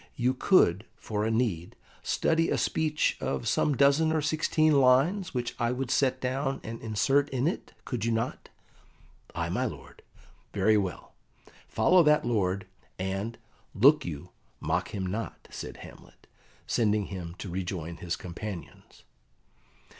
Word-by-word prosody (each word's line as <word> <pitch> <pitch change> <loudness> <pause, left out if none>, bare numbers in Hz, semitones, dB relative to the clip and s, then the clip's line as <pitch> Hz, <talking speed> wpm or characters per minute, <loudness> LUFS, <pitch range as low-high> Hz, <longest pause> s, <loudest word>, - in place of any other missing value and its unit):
You 125 +1 +1
could, 115 - +3
for 105 -1 -3
a - - +1
need, 110 -8 -1 0.3
study 165 0 +1
a - - +1
speech 155 -1 +1
of 65 -2 -2
some 145 -4 +2
dozen 140 +3 +4
or 160 - +2
sixteen 155 0 +2
lines, 145 +9 +3
which 120 -1 -2
I 120 0 +1
would 130 0 -3
set 130 -2 +2
down 135 +2 -1
and 115 +1 -7
insert 135 +6 +1
in 130 +1 0
it, 175 - -3
could 125 -5 -3
you 115 - +1
not?" 115 +2 -2 0.9
"Ay, - - -2
my - - 0
lord." - - -8 0.5
"Very 110 - +3
well. 95 -4 -2 0.5
Follow 185 0 +4
that 150 -2 +4
lord, 95 -4 0 0.3
and, 95 +5 -3 0.4
look 140 +9 +6
you, 75 -5 -7 0.3
mock - - -1
him 95 -2 -4
not," 105 +5 -5
said - - -7
Hamlet, - - -16 0.4
sending 105 -3 +1
him 85 -2 -6
to 100 - -7
rejoin 85 -2 -4
his 85 -1 -3
companions. 90 -2 -8
115 Hz, 145 wpm, -28 LUFS, 95-140 Hz, 0.9 s, look